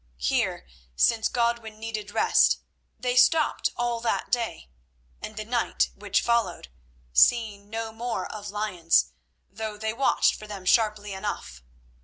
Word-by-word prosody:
Here, 60 Hz, +1 st, -1 dB, 0.3 s
since 225 Hz, -, +3 dB
Godwin 235 Hz, -2 st, -1 dB
needed 215 Hz, -2 st, -5 dB
rest, -, -, +4 dB, 0.4 s
they 250 Hz, -1 st, -1 dB
stopped 300 Hz, +5 st, +4 dB
all 240 Hz, -1 st, -1 dB
that 230 Hz, 0 st, -2 dB
day 230 Hz, -, -2 dB, 0.5 s
and 215 Hz, -, -8 dB
the 215 Hz, -, -4 dB
night 235 Hz, +1 st, 0 dB
which 205 Hz, -1 st, 0 dB
followed, 230 Hz, -, 0 dB, 0.4 s
seeing 205 Hz, -, +3 dB
no 225 Hz, 0 st, -4 dB
more 235 Hz, +2 st, -3 dB
of 210 Hz, -1 st, -7 dB
lions, 185 Hz, -, +1 dB, 0.4 s
though 215 Hz, +1 st, -6 dB
they 220 Hz, +1 st, -2 dB
watched 270 Hz, +4 st, +3 dB
for 215 Hz, -, -9 dB
them 200 Hz, -3 st, -8 dB
sharply 210 Hz, -1 st, +2 dB
enough. 190 Hz, -, -5 dB
220 Hz, 135 wpm, -26 LUFS, 205-235 Hz, 0.5 s, rest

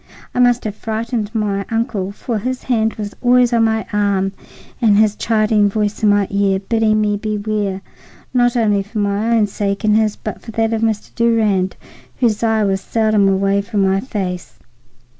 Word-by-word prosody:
I -, -, -2 dB
must 245 Hz, 0 st, +3 dB
have 215 Hz, -, -3 dB
frightened 220 Hz, 0 st, -3 dB
my 205 Hz, -2 st, -1 dB
uncle, 225 Hz, -4 st, -2 dB
for 220 Hz, +2 st, -4 dB
his 255 Hz, +4 st, -4 dB
hand 225 Hz, -3 st, 0 dB
was 205 Hz, -1 st, -6 dB
always 245 Hz, -1 st, +4 dB
on 230 Hz, -1 st, +4 dB
my 220 Hz, 0 st, 0 dB
arm 200 Hz, -2 st, +1 dB, 0.5 s
and 210 Hz, -3 st, +4 dB
his 215 Hz, -1 st, +3 dB
chiding 215 Hz, -2 st, +2 dB
voice 210 Hz, 0 st, -2 dB
in 215 Hz, -, +4 dB
my 205 Hz, -1 st, +3 dB
ear, 200 Hz, -1 st, +2 dB
bidding 215 Hz, +2 st, +1 dB
me 210 Hz, -1 st, +1 dB
beware, 210 Hz, -2 st, -2 dB, 0.5 s
not 245 Hz, 0 st, +2 dB
only 210 Hz, -3 st, +2 dB
for 205 Hz, +3 st, -8 dB
my 205 Hz, +2 st, 0 dB
own 215 Hz, -, +3 dB
sake 200 Hz, 0 st, -3 dB
and 210 Hz, -1 st, +3 dB
his, 215 Hz, -1 st, +2 dB
but 215 Hz, -, -7 dB
for -, -, -12 dB
that 225 Hz, +1 st, 0 dB
of 220 Hz, -, -1 dB
Mr. 220 Hz, -2 st, -1 dB
Durand, 215 Hz, -5 st, +1 dB, 0.4 s
whose 225 Hz, -4 st, +1 dB
eye 220 Hz, -2 st, +2 dB
was 195 Hz, -1 st, 0 dB
seldom 215 Hz, -2 st, +2 dB
away 195 Hz, +1 st, +1 dB
from 200 Hz, 0 st, -1 dB
my 190 Hz, 0 st, +2 dB
face. 190 Hz, -6 st, -5 dB
215 Hz, 180 wpm, -18 LUFS, 200-225 Hz, 0.5 s, always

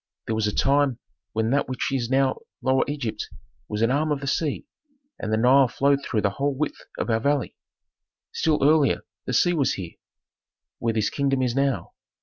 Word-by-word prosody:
There 115 Hz, -, -2 dB
was 110 Hz, -1 st, +1 dB
a -, -, 0 dB
time 140 Hz, +1 st, +2 dB, 0.4 s
when 110 Hz, +1 st, 0 dB
that 140 Hz, 0 st, +1 dB
which 130 Hz, -, -2 dB
is 120 Hz, -3 st, -1 dB
now 135 Hz, 0 st, +2 dB, 0.2 s
Lower 130 Hz, +1 st, +3 dB
Egypt 140 Hz, -7 st, -4 dB, 0.4 s
was 105 Hz, +1 st, -1 dB
an 115 Hz, -, +3 dB
arm 150 Hz, +3 st, +1 dB
of 145 Hz, -, 0 dB
the 140 Hz, -, -6 dB
sea, 150 Hz, -, -1 dB, 0.5 s
and 110 Hz, -, -3 dB
the 110 Hz, -, +2 dB
Nile 130 Hz, +3 st, +5 dB
flowed 140 Hz, +4 st, +1 dB
through 110 Hz, -, -1 dB
the 100 Hz, -, +1 dB
whole 140 Hz, +6 st, -1 dB
width 150 Hz, +2 st, -3 dB
of -, -, -1 dB
our 110 Hz, -, +2 dB
valley. 140 Hz, +3 st, 0 dB, 0.8 s
Still 155 Hz, -3 st, +1 dB
earlier 150 Hz, 0 st, +4 dB, 0.2 s
the 125 Hz, -, -3 dB
sea 175 Hz, +8 st, +3 dB
was 145 Hz, -6 st, +1 dB
here, 90 Hz, -4 st, -7 dB, 0.8 s
where 115 Hz, -1 st, -1 dB
this 110 Hz, -2 st, +1 dB
kingdom 135 Hz, -2 st, 0 dB
is 125 Hz, -2 st, 0 dB
now. 135 Hz, -1 st, 0 dB
135 Hz, 190 wpm, -24 LUFS, 115-140 Hz, 0.8 s, Nile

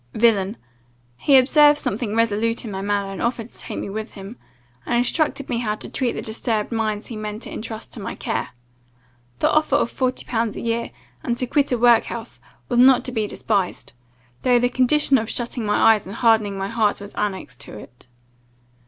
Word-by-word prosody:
villain. 215 Hz, -2 st, +2 dB, 0.6 s
He 275 Hz, -, +5 dB
observed 295 Hz, +3 st, +6 dB
something 215 Hz, -3 st, -3 dB
resolute 230 Hz, +1 st, +1 dB
in 215 Hz, -, -5 dB
my 190 Hz, 0 st, -4 dB
manner, 200 Hz, -1 st, -1 dB
and 195 Hz, -, -6 dB
offered 235 Hz, -1 st, -2 dB
to -, -, -14 dB
take -, -, -6 dB
me -, -, -4 dB
with 215 Hz, +3 st, -6 dB
him, 195 Hz, +3 st, -9 dB, 0.5 s
and 240 Hz, -, -1 dB
instruct 280 Hz, +3 st, 0 dB
me 240 Hz, -2 st, -1 dB
how 215 Hz, -3 st, -1 dB
to -, -, -8 dB
treat 250 Hz, -3 st, -1 dB
the -, -, -5 dB
disturbed 220 Hz, -1 st, -2 dB
minds 215 Hz, -2 st, -1 dB
he 235 Hz, -, -7 dB
meant 215 Hz, +1 st, -5 dB
to -, -, -8 dB
intrust 220 Hz, 0 st, -7 dB
to -, -, -6 dB
my 195 Hz, -, -5 dB
care. 115 Hz, -, -3 dB, 0.9 s
The -, -, +2 dB
offer 310 Hz, 0 st, +2 dB
of 235 Hz, -, +1 dB
forty 255 Hz, 0 st, -2 dB
pounds 225 Hz, -3 st, -1 dB
a -, -, -5 dB
year, 230 Hz, 0 st, -1 dB, 0.3 s
and 240 Hz, -2 st, -1 dB
to 250 Hz, -, -1 dB
quit 285 Hz, +3 st, +1 dB
a 245 Hz, -, +2 dB
workhouse, 235 Hz, 0 st, +2 dB, 0.3 s
was 240 Hz, -, +1 dB
not 255 Hz, 0 st, +6 dB
to 255 Hz, -, -3 dB
be 220 Hz, -3 st, -1 dB
despised, 200 Hz, -3 st, -2 dB, 0.5 s
though 250 Hz, -1 st, +4 dB
the 245 Hz, +1 st, +2 dB
condition 270 Hz, +2 st, +3 dB
of 220 Hz, +1 st, -4 dB
shutting 240 Hz, -2 st, -3 dB
my 215 Hz, +2 st, +5 dB
eyes 210 Hz, -4 st, -3 dB
and 195 Hz, -, -7 dB
hardening 220 Hz, -4 st, +2 dB
my 195 Hz, 0 st, -2 dB
heart 220 Hz, -2 st, +1 dB
was 200 Hz, 0 st, -10 dB
annexed 190 Hz, -10 st, -4 dB
to 105 Hz, -, -9 dB
it. 120 Hz, +4 st, -14 dB
230 Hz, 200 wpm, -22 LUFS, 210-245 Hz, 0.9 s, observed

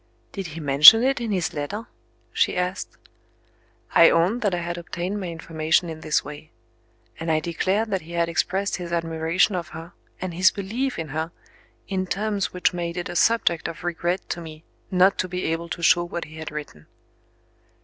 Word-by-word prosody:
"Did 195 Hz, -3 st, -5 dB
he 160 Hz, +1 st, -8 dB
mention 150 Hz, -, +9 dB
it 270 Hz, -1 st, +1 dB
in 230 Hz, -2 st, -3 dB
his 180 Hz, -5 st, -1 dB
letter?" 195 Hz, +10 st, -4 dB, 0.5 s
she -, -, +1 dB
asked. 180 Hz, +2 st, -3 dB, 1.0 s
I 165 Hz, -, +8 dB
owned 185 Hz, +9 st, +2 dB
that 205 Hz, -5 st, +1 dB
I -, -, -2 dB
had 175 Hz, 0 st, -4 dB
obtained 175 Hz, +4 st, -4 dB
my 185 Hz, -, -4 dB
information 165 Hz, 0 st, 0 dB
in 160 Hz, -, -8 dB
this 155 Hz, -, 0 dB
way. 150 Hz, +1 st, -10 dB, 0.7 s
And 165 Hz, 0 st, -2 dB
I 155 Hz, -, +3 dB
declared 190 Hz, +7 st, -1 dB
that 190 Hz, -2 st, 0 dB
he 170 Hz, +2 st, -11 dB
had 170 Hz, 0 st, +1 dB
expressed 190 Hz, +4 st, -1 dB
his 175 Hz, -2 st, -7 dB
admiration 165 Hz, +3 st, +1 dB
of 175 Hz, -3 st, -3 dB
her, 165 Hz, +2 st, -10 dB, 0.3 s
and 185 Hz, -2 st, -4 dB
his 185 Hz, +2 st, +5 dB
belief 230 Hz, +7 st, -3 dB
in 160 Hz, -2 st, -5 dB
her, 160 Hz, +4 st, -3 dB, 0.6 s
in 185 Hz, -1 st, -2 dB
terms 205 Hz, +1 st, -1 dB
which 180 Hz, 0 st, 0 dB
made 170 Hz, 0 st, -4 dB
it 175 Hz, -, -4 dB
a 175 Hz, -, -6 dB
subject 175 Hz, -5 st, +2 dB
of 165 Hz, -, -8 dB
regret 175 Hz, +1 st, -2 dB
to 170 Hz, -, -3 dB
me 155 Hz, -1 st, -10 dB, 0.3 s
not 185 Hz, +1 st, +3 dB
to 185 Hz, -, 0 dB
be 180 Hz, 0 st, -4 dB
able 165 Hz, +1 st, -2 dB
to 170 Hz, -, -5 dB
show 175 Hz, +1 st, +5 dB
what 175 Hz, 0 st, -5 dB
he 155 Hz, +1 st, -13 dB
had 160 Hz, -1 st, -6 dB
written. 145 Hz, -, -9 dB
175 Hz, 190 wpm, -24 LUFS, 160-190 Hz, 1.0 s, mention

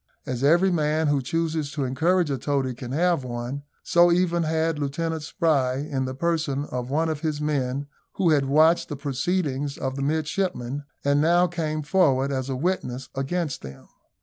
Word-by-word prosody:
As 130 Hz, 0 st, -3 dB
every 175 Hz, +6 st, +4 dB
man 155 Hz, -1 st, +1 dB
who 145 Hz, -2 st, +2 dB
chooses 160 Hz, +1 st, -1 dB
to 145 Hz, -, -2 dB
encourage 160 Hz, +5 st, +1 dB
a 135 Hz, -, -2 dB
toady 135 Hz, -1 st, -1 dB
can 125 Hz, 0 st, -8 dB
have 170 Hz, 0 st, +2 dB
one, 120 Hz, +3 st, -4 dB, 0.2 s
so 175 Hz, 0 st, +5 dB
even 175 Hz, -1 st, +2 dB
had 160 Hz, -1 st, 0 dB
Lieutenant 160 Hz, +3 st, -2 dB
Spry, 150 Hz, -6 st, +1 dB
in 135 Hz, -1 st, -2 dB
the 130 Hz, 0 st, -4 dB
person 155 Hz, -3 st, -1 dB
of 125 Hz, 0 st, -3 dB
one 160 Hz, +4 st, +1 dB
of 155 Hz, -2 st, -2 dB
his 155 Hz, -2 st, -2 dB
men, 140 Hz, -2 st, -1 dB, 0.3 s
who 175 Hz, -4 st, +2 dB
had 145 Hz, -3 st, +3 dB
watched 155 Hz, +5 st, +4 dB
the 145 Hz, -, -3 dB
proceedings 140 Hz, 0 st, -2 dB
of 130 Hz, 0 st, -3 dB
the 140 Hz, -, -4 dB
midshipmen, 145 Hz, -2 st, -1 dB, 0.2 s
and 140 Hz, 0 st, +3 dB
now 175 Hz, +3 st, +4 dB
came 155 Hz, -3 st, -2 dB
forward 140 Hz, -5 st, +2 dB
as 130 Hz, -1 st, -2 dB
a 135 Hz, -, -1 dB
witness 130 Hz, -5 st, -2 dB
against 140 Hz, +3 st, -2 dB
them. 70 Hz, -1 st, -11 dB
145 Hz, 175 wpm, -25 LUFS, 135-165 Hz, 0.3 s, so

